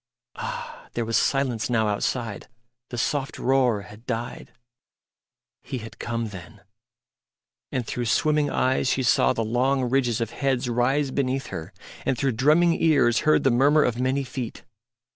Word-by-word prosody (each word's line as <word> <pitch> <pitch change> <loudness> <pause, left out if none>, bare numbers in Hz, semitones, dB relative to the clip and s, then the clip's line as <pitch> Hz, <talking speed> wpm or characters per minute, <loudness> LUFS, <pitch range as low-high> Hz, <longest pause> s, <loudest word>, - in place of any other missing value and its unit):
Ah! - - -6
there 120 - -1
was 115 0 -1
silence 130 -2 +1
now 110 -3 +2
outside; 105 +1 -2 0.4
the 120 - -6
soft 135 +3 -1
roar 125 -5 +2
had 105 +5 -14
died. 120 -1 -4 1.1
He 130 - -5
had 115 -1 -10
come 115 -1 -3
then. 95 +1 -11 1.1
And 125 -2 -2
through 120 +2 -3
swimming 150 +5 +2
eyes 130 0 +1
she 130 +1 +1
saw 120 - +4
the 115 - -1
long 130 +3 +1
ridges 120 -3 +1
of 115 -1 -2
heads 135 -2 -1
rise 130 +4 +1
beneath 135 0 -1
her, 80 +4 -6 0.3
and 130 - 0
through 135 +2 +1
drumming 155 +8 +3
ears 145 -7 +4
heard - - +4
the 135 - +4
murmur 145 +5 +4
of 125 0 0
many 130 +2 +1
feet. 125 -2 -6
125 Hz, 155 wpm, -25 LUFS, 115-135 Hz, 1.1 s, saw